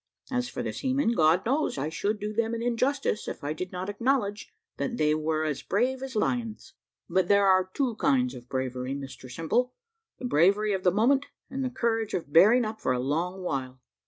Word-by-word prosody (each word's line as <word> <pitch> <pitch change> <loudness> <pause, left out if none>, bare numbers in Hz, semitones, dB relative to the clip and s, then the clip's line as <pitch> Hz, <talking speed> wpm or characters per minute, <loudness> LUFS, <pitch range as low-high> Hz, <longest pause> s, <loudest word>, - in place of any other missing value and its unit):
As 250 -1 -1
for - - -4
the - - -3
seamen, 265 -2 0
God 165 -4 +3
knows, 275 - 0
I 140 +3 -2
should 205 +6 -2
do 210 0 -4
them 230 +1 0
an 230 - -4
injustice 250 0 0
if - - -6
I 145 +1 -1
did 180 +4 -5
not 185 +1 -4
acknowledge 210 -1 -1 0.3
that 240 -2 -2
they 150 0 +3
were 155 0 0
as 150 -3 -2
brave 255 +6 0
as 265 -2 -6
lions. 230 0 -2 0.3
But 185 -2 +1
there 200 0 +4
are 185 -1 +4
two 250 0 -1
kinds 255 -1 +2
of 125 0 -11
bravery, 130 0 -3
Mr 135 -2 -8
Simple 165 - -1 0.4
the - - -7
bravery 200 +2 +3
of 190 - -1
the 185 - +4
moment, 260 +9 +2 0.2
and 270 0 -2
the 255 - -1
courage 225 -3 -1
of 145 -5 -5
bearing 220 +9 +6
up 215 0 -5
for 130 - +1
a 125 - -1
long 170 +8 -2
while. 130 -5 -3
205 Hz, 205 wpm, -27 LUFS, 155-245 Hz, 0.4 s, bearing